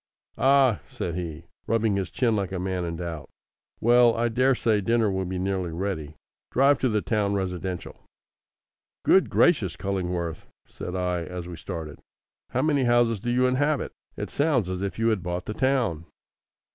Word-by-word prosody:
"Ah!" 130 - +4
said 85 - -4
he, 85 -2 -5 0.2
rubbing 110 -2 +2
his 95 -3 -2
chin 115 -4 +1
like 100 -3 -2
a 95 - -3
man 90 0 -2
in 85 -1 -3
doubt. 85 -3 -6 0.5
"Well, 120 0 +5
I 120 +1 +1
daresay 120 -3 +2
dinner 115 0 +2
will 95 0 -1
be 90 +1 -3
nearly 95 -2 -1
ready. 80 -4 -4 0.4
Drive 140 +2 +4
to 130 - +2
the 105 -2 0
town 105 -3 0
residential." 90 -1 -4 1.0
"Good 190 - +5
gracious, 110 - +3
Cullingworth!" 90 -4 -3 0.2
said 90 - -7
I 90 -1 -1
as 90 0 -6
we 90 - -7
started. 80 -2 -7 0.5
"How 130 - 0
many 145 -4 +2
houses 120 -2 +3
do 120 +5 -4
you 125 +1 +3
inhabit? 140 +3 +1 0.3
It - - -5
sounds 135 - +1
as 90 0 -3
if 100 -1 -3
you 115 +1 +2
had 110 -4 0
bought 90 0 -3
the 105 - -4
town." 120 - 0
100 Hz, 170 wpm, -26 LUFS, 90-120 Hz, 1.0 s, Well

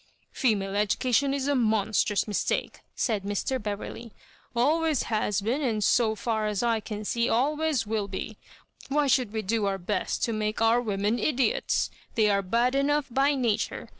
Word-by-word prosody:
" - - -41
Female 200 -6 0
education 245 +6 +1
is 275 0 -1
a 285 - +2
monstrous 215 -4 +1
mistake," 210 - -1 0.2
said 215 -4 0
Mr. 205 +6 -2
Beverley 210 +3 -6 0.2
— - - -27
*' - - -35
always 305 +3 +2
has 210 -2 0
been, 240 +8 -1
and, 225 -6 0
so 220 +1 +3
far 220 0 -1
as 210 +1 -1
I 230 -2 +2
can 210 -1 -6
see, 235 +3 0
always 295 +1 +1
will 210 -1 -2
be. 200 +2 -6 0.5
Why 295 +1 +2
should 255 -5 +2
we 220 0 -3
do 210 +1 0
our 195 0 -1
best 195 +3 -2
to 230 - 0
make 215 0 -2
our 225 +2 +4
women, 210 +1 -1
idiots? 310 - +1 0.2
They 215 -2 +3
are 200 0 +2
bad 235 +7 +1
enough 290 +1 +1
by 275 +3 +2
nature. 230 -5 -1
225 Hz, 180 wpm, -27 LUFS, 210-260 Hz, 0.5 s, our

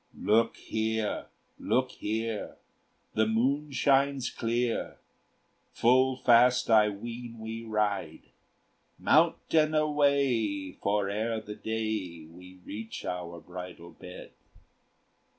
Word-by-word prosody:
"Look 115 +2 +2
here, 110 -1 -2 0.3
look 130 0 0
here 110 0 -4 0.6
the 110 0 +2
moon 135 +7 0
shines 140 -1 +2
clear 115 +1 -2 0.8
Full 130 +2 +3
fast 125 0 +4
I 105 -1 +6
ween 115 +3 -7
we 110 +1 -6
ride; 105 -7 -2 0.7
Mount - - +4 0.2
and 155 -1 +4
away! 140 -10 +1
for 100 0 +1
ere 110 +3 -1
the 105 -1 -8
day 105 -7 -4
We 90 +3 -14
reach 110 +2 -7
our 85 -1 -5
bridal 90 -1 -9
bed. 90 0 -11
110 Hz, 100 wpm, -29 LUFS, 100-125 Hz, 0.8 s, I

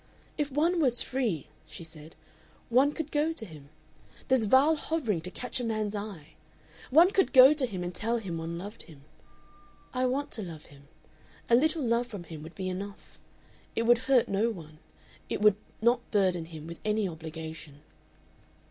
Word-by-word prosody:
"If 295 -1 -2
one 330 +6 +2
was 250 -5 +3
free," 235 - -1 0.2
she - - -9
said, 160 -1 -9 0.5
"one 260 +5 +4
could 310 0 -5
go 300 +2 +1
to 225 - -5
him.... 150 -6 -13 0.6
This 260 -4 +4
vile 270 +8 +5
hovering 280 - -1
to 180 - -6
catch 250 +6 -5
a - - -3
man's 215 -2 -1
eye!... 200 -7 -6 0.6
One 335 +8 +6
could 385 - +2
go 260 +2 +9
to 285 -4 -1
him 185 -5 -5
and 175 0 -4
tell 230 +6 0
him 180 -7 -4
one 165 +1 -4
loved 205 +5 -8
him. 145 -4 -15 0.9
I 255 0 +1
want 280 +3 -2
to 220 - -5
love 165 -5 -8
him. 140 0 -18 0.6
A - - +8
little 310 +4 +2
love 235 0 +1
from 205 -7 -7
him 160 -2 -9
would 160 +2 -11
be 190 -1 -4
enough. 195 +2 -7 0.6
It 230 - +1
would 235 0 +5
hurt 260 -3 +5
no 205 +4 +1
one. 155 -7 -9 0.5
It - - -2
would 210 -1 +5 0.3
not 240 +1 +2
burden 185 -5 +1
him 160 -2 -10
with 170 +1 -8
any 215 -1 +1
obligation." 160 -3 -8
210 Hz, 180 wpm, -29 LUFS, 165-255 Hz, 0.9 s, go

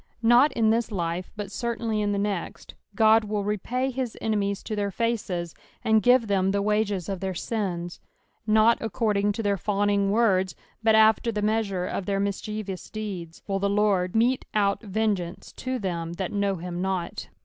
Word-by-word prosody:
Nut 240 +6 +6
in 220 -2 +3
this 230 0 0
life, 175 -2 -3
but 205 -2 -6
certainly 230 -1 -2
in 205 0 0
the 200 - 0
next, 200 -3 -3 0.3
Ood 220 0 +6
will 210 -1 -2
repay 240 +6 -1
his 255 -2 -4
enemies 200 -2 -1
to 215 - -4
their 205 -1 -1
faces, 195 -6 -2 0.3
aod 220 0 +4
give 245 0 +5
them 195 -2 +1
the 200 +1 +1
wages 210 -4 0
of 195 -2 -3
their 190 0 -3
sins. 175 -4 -3 0.5
Not 220 +2 +5
accoraing 205 -1 0
to 225 +2 -4
thnr 200 -2 +1
fawning 200 0 +1
words, 195 -4 +2 0.3
but 220 -1 +4
after 220 +1 +4
the 210 -1 -2
measure 210 -4 0
of 185 - -4
their 195 -1 0
mischievous 200 -1 -4
deeds, 190 -6 -6
will 195 -1 -1
the 200 +1 +1
Lord 200 -3 +1
mete 245 +3 +2
out 200 -1 +2
vengeance 200 -4 -2
to 255 0 -2
them 170 -6 -3
that 185 +1 -4
know 200 -1 +1
him 175 0 -5
not. 185 -2 -3
205 Hz, 175 wpm, -26 LUFS, 190-220 Hz, 0.5 s, Nut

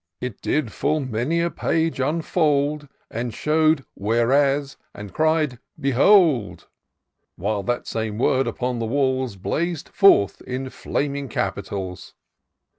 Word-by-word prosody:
331 125 -2 -3
It - - -39 0.2
did 115 - -11
full 155 +2 0
many 130 +6 -1
a 170 0 0
page 160 -3 -1
unfold, 150 0 0 0.2
And 120 +1 -3
show'd 155 -2 +2
WL^mBSf 135 +6 +2 0.2
and 105 -1 -9
cried, 155 -5 +1
' - - -26
Behold 140 - +3 0.4
!* - - -60 0.3
While 100 +2 -2
that 120 +4 -2
same 110 -2 -3
word 130 +2 +2
upon 125 +1 -2
the 115 - -2
walls 130 -2 0
Blaz'd 170 - -2
forth 195 - +4
in 130 +1 -5
flaming 140 -1 -3
Capitals. 95 -3 -4
135 Hz, 130 wpm, -23 LUFS, 115-155 Hz, 0.4 s, forth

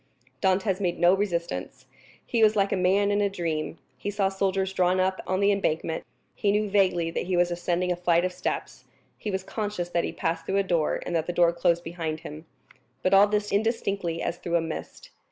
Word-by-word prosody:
Dantès 190 0 +2
made 175 -3 0
no 175 +1 +5
resistance; 170 - -2 0.4
he 230 - 0
was 215 0 +5
like 200 -1 +2
a - - +2
man 195 +2 +2
in 205 0 +2
a 200 - +2
dream; 165 -4 -3 0.2
he - - -3
saw 200 -1 +1
soldiers 195 0 -1
drawn 185 0 +2
up 185 0 +1
on 185 +1 0
the 200 0 +4
embankment; 160 -4 -1 0.3
he 200 - +1
knew 210 +1 +1
vaguely 180 -4 +2
that 170 - -3
he 185 -1 +1
was 175 0 +3
ascending 175 +1 -1
a - - +1
flight 175 0 +2
of 185 - -2
steps; - - -4 0.3
he 215 - -4
was 190 -1 -2
conscious 205 -4 -3
that 170 -1 0
he - - -2
passed 165 0 -3
through 195 - +1
a 200 - +3
door, 170 -5 0
and 175 - -2
that 160 -1 0
the 175 - -2
door 170 -1 +4
closed 170 0 +1
behind 165 -2 -4
him; 155 -1 -9 0.6
but 185 - +2
all 195 +1 +7
this 205 0 -1
indistinctly 200 -5 -1
as 175 - -2
through 170 -1 -2
a - - +5
mist. 160 -1 -7
185 Hz, 215 wpm, -26 LUFS, 170-200 Hz, 0.6 s, all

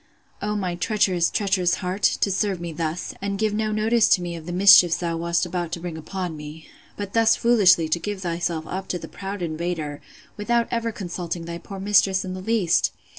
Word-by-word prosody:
O 210 +1 -2
my 185 -4 -2
treacherous, 180 -2 +1
treacherous 190 -3 +1
heart! 185 +2 -4
to 200 - +2
serve 195 -1 0
me 170 -1 -5
thus! 160 +2 -3
and 200 0 -2
give 215 0 0
no 215 0 -1
notice 220 +2 +2
to 180 - +4
me 175 -1 -4
of 165 0 -10
the - - -4
mischiefs 180 -2 +7
thou 170 -1 -2
wast 170 +1 0
about 175 -1 -3
to 175 - -3
bring 170 -1 -6
upon 175 +1 -5
me!—But 160 +6 -10
thus 225 0 +4
foolishly 195 -8 +4
to 170 - +1
give 205 +2 -5
thyself 170 -2 -2
up 190 +3 -5
to 180 - -2
the - - -9
proud 195 -1 -6
invader, 160 -2 -4 0.4
without 235 +3 +1
ever 230 -1 -1
consulting 175 -4 -5
thy 170 0 -6
poor 195 +3 -9
mistress 195 -1 +3
in 185 - -5
the 185 - -6
least! 195 -4 +1
185 Hz, 200 wpm, -23 LUFS, 170-205 Hz, 0.4 s, mischiefs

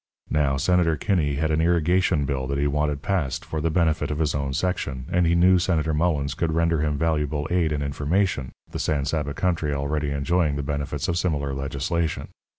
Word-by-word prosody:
Now, 70 -3 +2
Senator 85 +1 +2
Kinney 80 -9 0
had 80 +2 0
an 80 +1 +2
irrigation 85 -1 +2
bill 65 -1 -2
that 70 +1 -2
he 70 - +1
wanted 75 0 0
passed 90 -9 -1
for 80 - -3
the 80 - +1
benefit 80 -1 +1
of 75 - -2
his 80 -1 0
own 70 -1 -2
section, 70 -5 -2
and 90 -1 +3
he 85 - +3
knew 90 +1 +5
Senator 80 -3 0
Mullens 75 -3 0
could 85 -2 -1
render 85 0 +2
him 75 -1 0
valuable 75 -2 0
aid 85 -3 +2
and 75 -1 -1
information, 75 0 -1 0.2
the - - -4
San 70 -3 0
Saba 70 -1 -2
country 80 -5 0
already 70 +1 -1
enjoying 70 +2 +1
the 70 - -2
benefits 70 -1 -3
of 85 0 0
similar 70 -6 -1
legislation. 70 +4 -2
75 Hz, 195 wpm, -24 LUFS, 70-85 Hz, 0.2 s, knew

